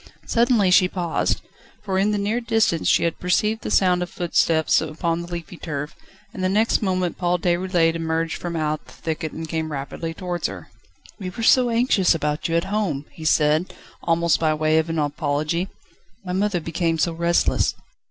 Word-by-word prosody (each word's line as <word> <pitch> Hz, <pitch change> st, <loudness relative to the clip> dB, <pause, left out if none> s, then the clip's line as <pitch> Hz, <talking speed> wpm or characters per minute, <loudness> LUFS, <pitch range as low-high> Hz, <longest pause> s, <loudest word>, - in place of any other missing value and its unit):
Suddenly 230 Hz, -5 st, +3 dB
she 185 Hz, 0 st, +6 dB
paused, 175 Hz, -3 st, -1 dB, 0.4 s
for 190 Hz, -2 st, -1 dB
in 200 Hz, +2 st, +2 dB
the 210 Hz, -, 0 dB
near 210 Hz, +4 st, -1 dB
distance 225 Hz, -8 st, +1 dB
she -, -, +4 dB
had 170 Hz, -1 st, -1 dB
perceived 210 Hz, +5 st, +1 dB
the -, -, -4 dB
sound 180 Hz, -2 st, +3 dB
of 180 Hz, -, -3 dB
footsteps 165 Hz, -2 st, +2 dB
upon 165 Hz, +2 st, -2 dB
the 170 Hz, +1 st, -9 dB
leafy 170 Hz, 0 st, -6 dB
turf, 150 Hz, -3 st, -5 dB, 0.4 s
and 185 Hz, -, -5 dB
the 185 Hz, -, +2 dB
next 215 Hz, +4 st, +2 dB
moment 185 Hz, -4 st, -1 dB
Paul 175 Hz, 0 st, +1 dB
Déroulède 175 Hz, -1 st, +1 dB
emerged 165 Hz, 0 st, -2 dB
from 175 Hz, -1 st, -5 dB
out 155 Hz, -1 st, -1 dB
the -, -, -16 dB
thicket 160 Hz, -1 st, -4 dB
and 160 Hz, 0 st, -6 dB
came 160 Hz, -1 st, -3 dB
rapidly 150 Hz, +4 st, -5 dB
towards 180 Hz, -1 st, -2 dB
her. -, -, -10 dB, 0.5 s
"We 185 Hz, -2 st, -4 dB
were 225 Hz, +6 st, -6 dB
so 250 Hz, +2 st, +5 dB
anxious 230 Hz, -7 st, +3 dB
about 150 Hz, -1 st, -1 dB
you 165 Hz, -, 0 dB
at 170 Hz, -, +2 dB
home!" 165 Hz, -10 st, -1 dB
he 160 Hz, -, -10 dB
said, 155 Hz, +3 st, +2 dB, 0.3 s
almost 170 Hz, -1 st, +2 dB
by 155 Hz, -1 st, +2 dB
way 155 Hz, +1 st, +2 dB
of 160 Hz, +1 st, -2 dB
an 165 Hz, -, -2 dB
apology. 150 Hz, +3 st, -1 dB, 0.6 s
"My 180 Hz, -, -3 dB
mother 195 Hz, -1 st, +1 dB
became 165 Hz, 0 st, -1 dB
so 165 Hz, +1 st, +1 dB
restless 170 Hz, +1 st, +1 dB
170 Hz, 185 wpm, -22 LUFS, 160-185 Hz, 0.6 s, she